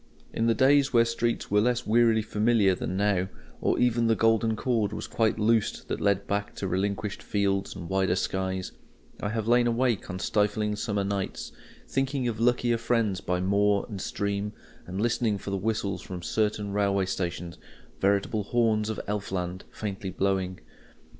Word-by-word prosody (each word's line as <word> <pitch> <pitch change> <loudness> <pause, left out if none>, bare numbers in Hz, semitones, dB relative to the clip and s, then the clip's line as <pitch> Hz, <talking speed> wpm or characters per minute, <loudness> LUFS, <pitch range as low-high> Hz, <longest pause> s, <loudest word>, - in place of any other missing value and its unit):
In 115 - +1
the 115 - +3
days 135 +3 +4
when 115 -1 +5
streets 115 -1 -1
were 105 0 +4
less 125 +1 +1
wearily 115 0 +4
familiar 105 -2 +3
than 90 0 -3
now, 100 -2 +2 0.3
or - - +1
ever 120 -1 +3
the 115 -1 +3
golden 115 0 +2
cord 110 -2 0
was - - -4
quite 110 -1 +1
loosed 110 0 +1
that - - -2
led 100 0 +2
back 100 0 -2
to 95 - -3
relinquished 100 +2 -2
fields 100 -1 -1
and 85 - -7
wider 95 -1 +1
skies, 95 0 -2 0.5
I 105 - -1
have 110 0 -2
lain 120 0 +4
awake 120 -2 0
on 90 - -4
stifling 105 +2 0
summer 105 -1 -1
nights, 100 -1 -3 0.4
thinking 135 -1 -1
of 110 -2 -3
luckier 120 0 +2
friends 115 -5 0
by 90 0 -1
moor 100 +1 +2
and 100 -4 -6
stream, 100 +1 -2 0.3
and 95 +2 -4
listening 115 -1 +1
for 100 - -6
the 100 - 0
whistles 100 -1 -1
from 90 -2 -7
certain 105 0 -1
railway 100 -1 +2
stations, 90 -2 -4 0.4
veritable 100 +1 +1
"horns 110 -2 +1
of 110 - -3
Elf 105 -1 -3
land, 90 -1 -3
faintly 100 -2 -5
blowing." 95 -1 -1
105 Hz, 170 wpm, -27 LUFS, 95-115 Hz, 0.5 s, when